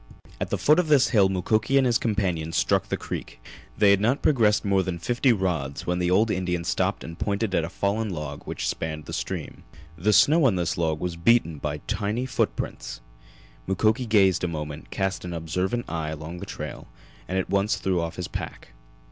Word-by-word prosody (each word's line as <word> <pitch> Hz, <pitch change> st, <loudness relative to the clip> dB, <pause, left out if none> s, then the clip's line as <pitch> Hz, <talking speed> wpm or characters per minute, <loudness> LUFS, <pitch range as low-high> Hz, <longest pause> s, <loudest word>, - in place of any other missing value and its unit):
At -, -, -2 dB
the -, -, 0 dB
foot 155 Hz, +3 st, +4 dB
of 180 Hz, -, +1 dB
this 145 Hz, -3 st, +5 dB
hill 100 Hz, -5 st, +4 dB
Mukoki 110 Hz, +7 st, +1 dB
and 135 Hz, -, +4 dB
his 120 Hz, -2 st, +3 dB
companion 90 Hz, -7 st, -1 dB
struck -, -, +1 dB
the -, -, -1 dB
creek. -, -, -6 dB, 0.4 s
They 105 Hz, -2 st, +6 dB
had 100 Hz, 0 st, +3 dB
not 120 Hz, +6 st, +1 dB
progressed 110 Hz, -9 st, +3 dB
more 100 Hz, -1 st, +3 dB
than 90 Hz, -2 st, -3 dB
fifty 120 Hz, +8 st, +2 dB
rods 85 Hz, -, -1 dB
when 90 Hz, 0 st, 0 dB
the 90 Hz, 0 st, +1 dB
old 105 Hz, +5 st, +3 dB
Indian 90 Hz, -2 st, -1 dB
stopped -, -, -1 dB
and 85 Hz, 0 st, -9 dB
pointed 100 Hz, 0 st, -1 dB
at 85 Hz, -, +2 dB
a 80 Hz, -, -3 dB
fallen 100 Hz, +4 st, -1 dB
log 75 Hz, -5 st, -5 dB
which -, -, -3 dB
spanned 80 Hz, -1 st, -3 dB
the -, -, -7 dB
stream. -, -, -5 dB, 0.3 s
The 90 Hz, +6 st, +1 dB
snow 150 Hz, +8 st, +5 dB
on 115 Hz, -7 st, +4 dB
this 85 Hz, -2 st, -1 dB
log 80 Hz, -2 st, 0 dB
was 90 Hz, 0 st, -3 dB
beaten 85 Hz, -4 st, +3 dB
by 75 Hz, 0 st, -3 dB
tiny 105 Hz, +3 st, -1 dB
footprints. 130 Hz, -, -2 dB, 0.7 s
Mukoki 110 Hz, +6 st, +1 dB
gazed 95 Hz, -5 st, +4 dB
a -, -, +2 dB
moment, 75 Hz, -2 st, -6 dB
cast 95 Hz, -1 st, -2 dB
an 90 Hz, -1 st, -5 dB
observant 90 Hz, +8 st, -2 dB
eye 80 Hz, -2 st, -3 dB
along 80 Hz, +3 st, -6 dB
the -, -, -7 dB
trail, -, -, -7 dB, 0.4 s
and 95 Hz, -, -2 dB
at 95 Hz, -, -2 dB
once 100 Hz, +2 st, +2 dB
threw 95 Hz, -3 st, 0 dB
off 85 Hz, -1 st, -4 dB
his 90 Hz, -, -4 dB
pack. -, -, -7 dB
95 Hz, 200 wpm, -25 LUFS, 85-110 Hz, 0.7 s, They